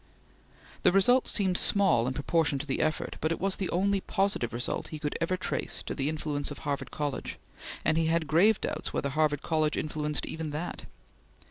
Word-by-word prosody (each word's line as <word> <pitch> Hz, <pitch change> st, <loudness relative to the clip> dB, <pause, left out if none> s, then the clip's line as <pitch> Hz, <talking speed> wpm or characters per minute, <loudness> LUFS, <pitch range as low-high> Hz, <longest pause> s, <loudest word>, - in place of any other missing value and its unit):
The -, -, +5 dB
result 245 Hz, +7 st, +4 dB
seemed 190 Hz, -3 st, +1 dB
small 185 Hz, -, +4 dB
in 130 Hz, -, -2 dB
proportion 150 Hz, 0 st, +1 dB
to 140 Hz, -, -4 dB
the 135 Hz, -, -1 dB
effort, 155 Hz, 0 st, -1 dB
but 155 Hz, -, +1 dB
it 165 Hz, -, -1 dB
was 195 Hz, +1 st, +1 dB
the 190 Hz, -, -2 dB
only 195 Hz, +2 st, +1 dB
positive 195 Hz, -, 0 dB
result 120 Hz, +1 st, -3 dB
he 155 Hz, -, -6 dB
could 150 Hz, -1 st, -3 dB
ever 185 Hz, +2 st, +1 dB
trace 185 Hz, -, -3 dB
to -, -, -4 dB
the 140 Hz, +2 st, -1 dB
influence 150 Hz, -2 st, -2 dB
of 145 Hz, -, -7 dB
Harvard 140 Hz, -1 st, -2 dB
College, 145 Hz, -2 st, -3 dB, 0.5 s
and 155 Hz, +1 st, +3 dB
he 165 Hz, -, +1 dB
had 165 Hz, 0 st, +1 dB
grave 185 Hz, +8 st, +4 dB
doubts -, -, -4 dB
whether 140 Hz, -, -1 dB
Harvard 150 Hz, 0 st, +1 dB
College 155 Hz, -2 st, +1 dB
influenced 150 Hz, -2 st, -2 dB
even 160 Hz, -1 st, -4 dB
that. 155 Hz, +4 st, -5 dB
155 Hz, 195 wpm, -29 LUFS, 145-185 Hz, 0.5 s, The